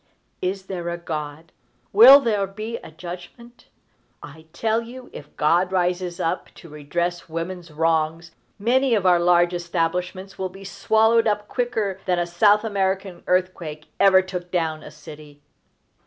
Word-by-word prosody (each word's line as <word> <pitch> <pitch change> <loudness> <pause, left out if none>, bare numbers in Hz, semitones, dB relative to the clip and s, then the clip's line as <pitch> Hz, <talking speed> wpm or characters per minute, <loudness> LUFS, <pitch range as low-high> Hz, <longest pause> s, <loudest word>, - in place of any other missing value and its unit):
_ - - -44 0.4
Is 190 +1 -3
there 175 -3 -5
a 170 - -3
God? 155 -2 -6 0.4
Will 250 +7 +10
there 210 -6 0
be 215 +4 -6
a - - -12
judgment? 180 +9 -11 0.6
I 160 +2 -12
tell 225 +5 0
you, 250 +2 -11
if 145 - -12
God 175 +5 +2
rises 180 -1 -1
up 180 +1 -2
to 170 - -14
redress 170 +4 -3
woman's 170 +1 -5
wrongs, 160 +1 -1 0.3
many 245 +3 +2
of 200 -3 -1
our 180 -1 +5
large 175 0 +3
establishments 180 +2 -3
will 190 0 -2
be 195 +2 -13
swallowed 220 +3 +2
up 210 -1 -1
quicker 220 -6 -2
than 180 -1 +2
a 175 - 0
South 205 +5 +3
American 190 -3 -2
earthquake 175 -4 -2
ever 190 -1 +6
took 180 -1 -6
down 160 -3 -1
a - - -10
city. 150 -2 -14
180 Hz, 155 wpm, -22 LUFS, 165-200 Hz, 0.6 s, Will